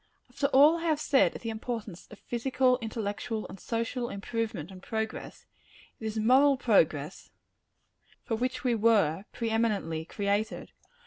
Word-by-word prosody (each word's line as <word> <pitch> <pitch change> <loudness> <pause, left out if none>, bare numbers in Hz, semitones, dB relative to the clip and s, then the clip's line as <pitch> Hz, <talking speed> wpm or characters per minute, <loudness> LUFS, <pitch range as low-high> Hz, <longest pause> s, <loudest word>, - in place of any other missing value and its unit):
After 280 - 0
all 290 +4 +6
I 335 - -5
have 310 -3 +2
said 280 -3 +3
of - - -8
the 230 - -2
importance 220 -4 -6
of 210 - -12
physical, 250 +2 +1
intellectual 220 0 -4
and 195 - -11
social 235 +3 -2
improvement 200 -4 -4
and 185 -1 -11
progress, 220 +2 -5 0.5
it 220 - -4
is 220 0 -4
moral 265 +5 +5
progress 160 - +1 0.9
for 225 - -2
which 255 +3 -2
we 250 -2 +2
were, 205 -6 +2
pre 230 -2 -3
eminently, 205 -8 0
created. 205 +4 -2
225 Hz, 145 wpm, -29 LUFS, 205-250 Hz, 0.9 s, all